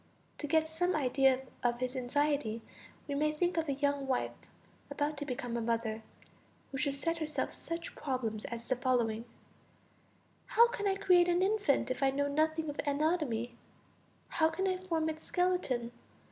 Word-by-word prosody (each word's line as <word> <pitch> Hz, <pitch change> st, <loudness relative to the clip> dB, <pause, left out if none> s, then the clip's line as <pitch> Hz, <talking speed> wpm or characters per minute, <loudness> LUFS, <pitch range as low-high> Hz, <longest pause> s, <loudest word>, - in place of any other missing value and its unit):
To 295 Hz, -, -2 dB
get 315 Hz, +2 st, +3 dB
some 355 Hz, +3 st, 0 dB
idea 265 Hz, -2 st, +3 dB, 0.2 s
of 240 Hz, 0 st, +1 dB
his 255 Hz, +1 st, -3 dB
anxiety 255 Hz, -3 st, 0 dB, 0.4 s
we 285 Hz, -, -2 dB
may 305 Hz, +2 st, +2 dB
think 350 Hz, +4 st, 0 dB
of 325 Hz, -2 st, 0 dB
a -, -, +2 dB
young 280 Hz, 0 st, 0 dB
wife 260 Hz, -2 st, 0 dB, 0.6 s
about 295 Hz, +1 st, -1 dB
to 290 Hz, 0 st, -4 dB
become 245 Hz, -2 st, -3 dB
a 235 Hz, -, 0 dB
mother, 225 Hz, -1 st, -1 dB, 0.7 s
who 270 Hz, -, -3 dB
should 285 Hz, -2 st, +1 dB
set 330 Hz, +4 st, -1 dB
herself 305 Hz, -1 st, -2 dB
such 335 Hz, 0 st, -5 dB
problems 235 Hz, -6 st, -2 dB
as 235 Hz, 0 st, -6 dB
the 255 Hz, -, +2 dB
following: 235 Hz, -3 st, +1 dB, 1.2 s
how 470 Hz, +1 st, +6 dB
can 415 Hz, -4 st, -2 dB
I 385 Hz, -, +2 dB
create 360 Hz, -3 st, +5 dB
an 350 Hz, +1 st, +3 dB
infant, 400 Hz, -11 st, +2 dB
if 255 Hz, -, -3 dB
I 270 Hz, -, +5 dB
know 285 Hz, +1 st, 0 dB
nothing 315 Hz, +2 st, +1 dB
of 290 Hz, -, -5 dB
anatomy; 285 Hz, -5 st, 0 dB, 0.7 s
how 320 Hz, -1 st, +3 dB
can 375 Hz, +4 st, -1 dB
I 370 Hz, -1 st, +1 dB
form 335 Hz, -4 st, -1 dB
its 315 Hz, 0 st, -3 dB
skeleton? 355 Hz, -10 st, 0 dB
290 Hz, 170 wpm, -33 LUFS, 255-330 Hz, 1.2 s, how